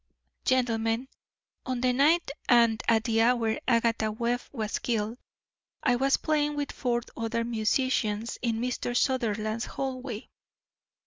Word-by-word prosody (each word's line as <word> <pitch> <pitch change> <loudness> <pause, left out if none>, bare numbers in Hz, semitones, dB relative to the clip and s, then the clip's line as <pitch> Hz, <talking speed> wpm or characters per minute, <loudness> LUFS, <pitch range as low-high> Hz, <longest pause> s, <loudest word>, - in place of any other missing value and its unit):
"Gentlemen, 235 -1 +1 0.5
on 255 -2 -3
the 250 0 +3
night 300 +4 +3 0.2
and 235 -3 +5
at 225 -1 +4
the 225 -1 +2
hour 230 -2 +2
Agatha 230 -3 +2
Webb 235 +3 -1
was 220 -5 -3
killed, 225 0 -2 0.6
I 250 -4 +3
was 270 +2 +3
playing 295 -1 0
with 290 -1 -2
four 240 -2 -1
other 230 0 -1
musicians 230 -1 0
in 230 -2 0
Mr. 245 0 -1
Sutherland's 225 -4 0
hallway. 255 -4 -5
240 Hz, 125 wpm, -28 LUFS, 225-255 Hz, 0.6 s, and